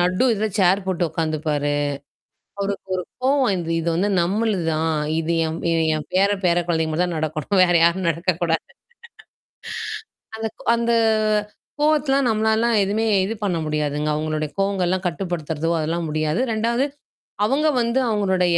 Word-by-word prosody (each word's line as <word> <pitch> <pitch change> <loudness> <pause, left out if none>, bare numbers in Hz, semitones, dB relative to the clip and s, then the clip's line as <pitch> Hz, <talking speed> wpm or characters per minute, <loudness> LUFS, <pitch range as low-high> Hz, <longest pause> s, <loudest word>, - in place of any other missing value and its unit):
நடு 180 +6 +2
இதில 215 +1 -1
சேர் 190 +1 +3
போட்டு 185 -2 -1
உட்காந்துப்பாரு. 155 -2 -1 0.9
அவருக்கு 200 -1 -3
ஒரு 180 - -2 0.2
கோவம் 275 +2 +3
வந்து 175 -4 -2
இது 165 - -2
வந்து 195 +4 +1
நம்மளுது 200 0 0
தான். 160 +1 0 0.3
இது 165 +1 -1
என் 160 +1 -4 0.4
என் 155 - -6
பேர 195 +2 +4
பேர 175 -1 +3
குழந்தைங்க 160 -2 0
மட்டும்தான் 175 +1 0
நடக்கணும் 155 +4 0
வேற 175 -1 +2
யாரும் 170 +1 +2
நடக்கக்கூடாது. 165 0 -1 1.7
அந்த 225 0 -2 0.3
அந்த 235 0 0 0.9
கோவத்தலாம் 285 -3 +2
நம்மளாலலாம் 220 +1 +2
எதுவுமே 210 +3 0 0.2
இது 210 - -2
பண்ண 185 -4 0
முடியாதுங்க. 150 0 -1
அவங்களுடைய 155 0 -2
கோவங்கள்லாம் 185 -2 0
கட்டுப்படுத்துறதோ 165 -3 -3
அதெல்லாம் 165 +2 -2
முடியாது. 155 +6 0
ரெண்டாவது 235 +4 +1 0.6
அவங்க 275 +7 +2
வந்து 235 +2 +1
அவங்களுடைய 190 -5 +2
180 Hz, 130 wpm, -22 LUFS, 160-215 Hz, 1.7 s, பேர